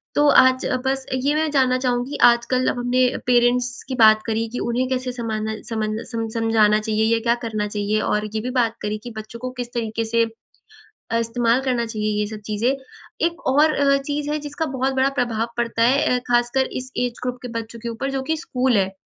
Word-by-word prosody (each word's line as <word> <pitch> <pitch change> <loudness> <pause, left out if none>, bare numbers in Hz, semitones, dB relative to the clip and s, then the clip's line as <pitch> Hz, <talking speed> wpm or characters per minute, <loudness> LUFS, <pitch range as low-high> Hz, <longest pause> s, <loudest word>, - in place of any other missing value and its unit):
तो 295 0 +4
आज 260 -2 +5 0.2
बस 265 0 -1
ये 270 +3 +1
मैं 315 0 +1
जानना 260 -3 +3
चाहूँगी 250 +2 -1
आजकल 240 +2 +4
अब - - -2
हमने 245 +1 +1 0.3
पेरेंट्स 245 0 +2
की 260 - -2
बात 215 -2 +6
करी 225 0 -1
कि 245 - -3
उन्हें 245 +2 -1
कैसे 255 -1 -1
समाना 220 -3 -3
समझना 220 -1 -2
सम 225 -1 -2
समझाना 225 -2 +3
चाहिए 215 0 0
या 230 - +2
क्या 235 +1 +2
करना 215 -2 -2
चाहिए? 205 +1 -1
और 210 0 0
ये - - +1
भी 250 - -4
बात 235 -3 +1
करी 210 0 -2
कि 240 - -7
बच्चों 220 +2 -8
को 255 +1 -4
किस 245 -1 -5
तरीके 230 -1 -2
से 230 +1 +2 0.9
अ, 230 - +2
इस्तेमाल 230 +1 +1
करना 250 -3 0
चाहिए 215 -2 -2
ये 210 - +1
सब 215 0 -7
चीज़ें। 215 +3 0 0.6
एक 340 0 -8
और 295 +4 +4
अ, 275 0 +3
चीज़ 290 +1 -3
है 300 - 0
जिसका 290 +2 -4
बहुत 265 +1 0
बड़ा 265 +1 +3
प्रभाव 230 -2 0
पड़ता 230 -1 0
है 265 +5 +4 0.2
अ, - - -2
खासकर 240 +2 +2 0.2
इस 255 +1 -11
ऐज 245 -1 0
ग्रुप 250 0 -2
के 250 - -6
बच्चों 230 +1 -9
के 235 +1 -5
ऊपर 270 +4 -3
जो 270 - -2
कि 320 - +1
स्कूल 255 -6 0
है। 190 -1 +1
240 Hz, 215 wpm, -22 LUFS, 225-260 Hz, 0.9 s, बात